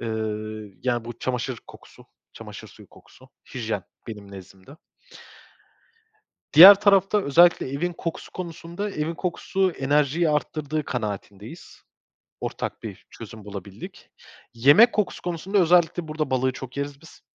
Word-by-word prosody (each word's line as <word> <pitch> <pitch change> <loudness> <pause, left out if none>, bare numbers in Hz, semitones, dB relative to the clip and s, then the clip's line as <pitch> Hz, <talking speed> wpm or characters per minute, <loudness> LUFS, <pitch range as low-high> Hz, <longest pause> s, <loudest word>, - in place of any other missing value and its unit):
Eee, 120 - -5 0.8
yani 120 -2 -1
bu 120 0 -9
çamaşır 125 -1 -3
kokusu, - - -16 0.3
çamaşır - - -11
suyu - - -17
kokusu, - - -20 0.3
hijyen - - -3 0.2
benim 105 -3 -9
nezdimde. 95 - -13 1.8
Diğer 185 +7 +12
tarafta 200 0 +3
özellikle 170 0 +4
evin 165 +6 -3
kokusu 165 0 -6
konusunda, 170 +3 -6
evin 155 0 -3
kokusu 185 +2 -1
enerjiyi 150 +3 +1
arttırdığı 150 0 -2
kanaatindeyiz. 105 - -7 0.6
Ortak - - -5
bir - - -9
çözüm 110 -2 -12
bulabildik. 100 -1 -10 0.4
Yemek 145 - +6
kokusu 210 -4 -2
konusunda 180 +3 -3
özellikle 175 -2 +3
burada 155 -2 -3
balığı 130 0 +1
çok 130 +1 -10
yeriz 140 0 -5
biz. 165 - -17
150 Hz, 120 wpm, -24 LUFS, 125-175 Hz, 1.8 s, Diğer